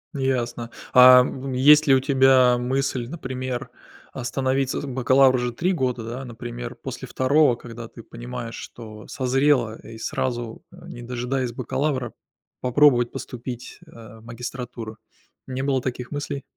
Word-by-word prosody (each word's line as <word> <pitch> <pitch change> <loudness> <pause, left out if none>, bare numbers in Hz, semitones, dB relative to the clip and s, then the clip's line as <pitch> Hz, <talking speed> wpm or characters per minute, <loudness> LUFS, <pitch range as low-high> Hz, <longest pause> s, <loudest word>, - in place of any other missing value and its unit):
Ясно. 120 -3 -2 0.2
А, 125 0 +9
м, 130 +1 -4
есть 150 +4 +6
ли 135 - +5
у 130 - +5
тебя 130 -2 +4
мысль, 130 -1 -1
например, 130 -4 -5 0.4
остановиться, 130 +1 -1
бакалавр 130 0 +4
же 125 -1 -2
3 175 +10 0
года, 125 -8 -1
да, 120 +4 -6
например, 120 0 -7
после 130 0 -7
2, 130 0 +3
когда 115 -1 -9
ты 115 - -13
понимаешь, 120 0 -7
что 110 -3 -10
созрела 130 -3 +1
и 115 0 -11
сразу, 120 -1 -3
не 120 - -11
дожидаясь 125 +1 -2
бакалавра, 130 0 -2 0.5
попробовать 125 -1 +4
поступить, 125 0 -7
а, 115 -7 -14
в - - -18
магистратуру? 120 -2 -7 0.5
Не 130 0 -4
было 135 -1 +1
таких 125 -1 -4
мыслей? 145 -1 -4
125 Hz, 135 wpm, -23 LUFS, 120-135 Hz, 0.5 s, А